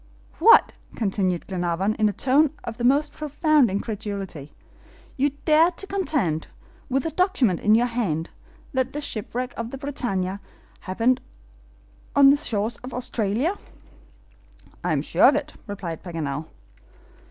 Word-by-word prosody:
"What!" - - +7 0.2
continued 190 -4 -1
Glenarvan, 180 +2 -1
in 215 -1 +2
a - - -1
tone 270 - +3
of 230 -1 -6
the - - -3
most 280 +5 +3
profound 300 -3 +2
incredulity, 200 - -5 0.6
"you 280 +2 +2 0.2
dare 315 +2 +5
to 360 +2 -6
contend, 295 - -1 0.4
with 265 +1 +1
the 325 - -2
document 305 - +1
in 210 +1 +4
your 235 +2 +3
hand, 200 -10 -2 0.4
that 260 -1 0
the 295 - -3
shipwreck 245 0 -4
of 230 0 -4
the 270 - -7
BRITANNIA 205 -9 -2 0.5
happened 230 +7 +2 0.9
on 275 -1 +8
the 285 - +4
shores 220 -5 -1
of 250 0 -8
Australia." 245 - -1 1.3
"I - - 0
am - - +1
sure - - +4
of - - +5
it," - - -3
replied 185 -5 -5
Paganel. 155 -4 -4
230 Hz, 140 wpm, -24 LUFS, 195-280 Hz, 1.3 s, on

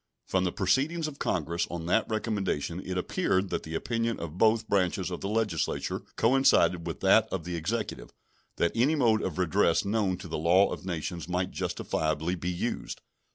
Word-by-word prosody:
From 95 -1 +1
the 90 - 0
proceedings 140 - +1
of 145 -2 -8
Congress 85 0 -1
on 85 -1 -5
that 100 +7 +1
recommendation 100 -7 -2
it 90 -1 -4
appeared 95 +1 0
that - - -1
the 80 0 -6
opinion 115 +4 -1
of 85 -1 -6
both 110 0 +3
branches 95 -1 +1
of 90 - -5
the 100 - -3
Legislature 105 -7 -1 0.2
coincided 95 -9 +3
with 85 - -5
that 95 +3 +5
of 95 -4 -2
the 90 +1 -4
Executive, 105 +8 -3 0.5
that 85 - +2
any 130 +7 +3
mode 115 -6 +3
of 90 -3 -3
redress 90 0 +2
known 100 -3 0
to 90 - -9
the 80 - -3
law 90 +5 +4
of 95 - -8
nations 85 0 -4
might 90 +1 -1
justifiably 80 +2 -1
be 90 0 -3
used. 90 -1 -3
95 Hz, 180 wpm, -28 LUFS, 85-110 Hz, 0.5 s, that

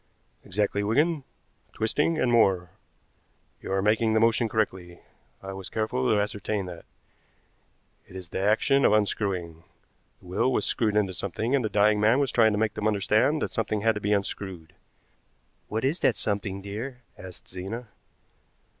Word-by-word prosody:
"Exactly, 100 +1 -1
Wigan, 145 +8 +1 0.5
twisting, 150 +9 0
and 125 -4 +2
more. 95 -7 +3 0.9
You - - -6
are 95 0 +1
making 110 +1 +2
the 110 - +4
motion 115 0 +3
correctly, 95 -5 -2 0.4
I 95 0 -6
was 95 -1 -7
careful 110 - -1
to 105 - +3
ascertain 105 -1 -2
that. 85 -2 -9 1.2
It - - -15
is 90 -3 -8
the - - -4
action 110 +8 +3
of - - +5
unscrewing. 95 -6 -1 0.6
The - - -20
will 90 +8 0
was - - +1
screwed 110 -3 0
into 100 -3 +1
something, 105 +7 -3
and 135 -3 +2
the 110 - -1
dying 105 +1 +3
man 110 +4 +4
was 140 -4 +1
trying 110 -2 +4
to - - 0
make 110 0 0
them 105 - -1
understand 110 +8 +2
that - - -4
something 110 -2 -1
had 110 +1 +3
to 105 - -5
be 105 - -1
unscrewed." 95 -4 -3 0.9
"What 110 +3 -2
is 155 +6 0
that 125 - +3
something, 100 -2 -2
dear?" 120 +6 -6
asked 90 -1 -10
Zena. 105 +6 -6
105 Hz, 165 wpm, -26 LUFS, 95-115 Hz, 1.2 s, of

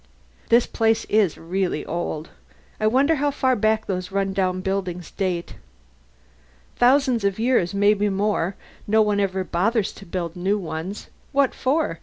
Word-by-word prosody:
"This 235 +1 +5
place 225 0 +1
is 210 -6 +2
really 180 0 -2
old. 160 -2 -4 0.5
I 215 - +2
wonder 275 +7 +3
how 290 +1 +1
far 260 -2 +1
back 215 0 +1
those 185 -1 -3
run 195 0 0
down 185 -1 0
buildings 185 -2 -3
date." 180 -3 -3 1.2
"Thousand 255 -1 +4 0.2
years, 220 -6 +1
maybe 205 +1 +3
more. 195 -2 0 0.3
No 220 +1 +4
one 210 -1 +1
ever 190 -1 0
bothers 195 +5 0
to 195 - -13
build 170 -1 -4
new 190 +4 0
ones. 175 +2 -6 0.2
What 275 -1 +3
for? 265 - 0
200 Hz, 145 wpm, -23 LUFS, 185-225 Hz, 1.2 s, This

